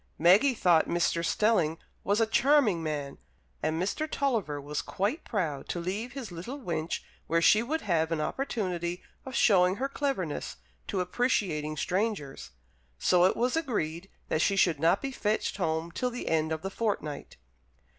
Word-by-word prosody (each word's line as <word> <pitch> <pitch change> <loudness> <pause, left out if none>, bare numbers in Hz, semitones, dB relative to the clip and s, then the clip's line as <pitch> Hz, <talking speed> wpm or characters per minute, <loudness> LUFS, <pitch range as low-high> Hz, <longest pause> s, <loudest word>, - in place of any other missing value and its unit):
Maggie 200 - +5
thought 175 -6 +4
Mr. 170 -1 +1
Stelling 170 -4 +2 0.3
was 205 +3 +1
a 225 - +4
charming 240 - +3
man, 145 -3 -4 0.4
and 160 +1 -1
Mr. 255 - -1
Tulliver 225 - -1
was 145 +1 -3
quite 210 - -2
proud 160 -10 -3
to 175 - -2
leave 205 +8 -4
his 265 -8 -6
little 185 +12 -6
wench 165 - -3 0.3
where 165 +1 +2
she 210 +6 +5
would 310 +7 -2
have 165 -5 0
an 165 - 0
opportunity 180 - -2 0.2
of 260 - -6
showing 185 -5 +4
her 265 +5 -1
cleverness 270 - -3 0.3
to 190 - -1
appreciating 180 - 0
strangers. 185 -8 -2 0.5
So 180 - +4
it 185 - +2
was 250 +4 +1
agreed 195 - -2 0.2
that 155 - 0
she 200 - +2
should 170 -6 +3
not 165 +5 +3
be 275 - -2
fetched 215 -6 -1
home 160 -2 -1
till 250 +8 -1
the 245 0 -5
end 160 -1 +1
of 160 +1 -3
the 195 - -3
fortnight. 195 -10 -3
185 Hz, 165 wpm, -29 LUFS, 160-230 Hz, 0.5 s, Maggie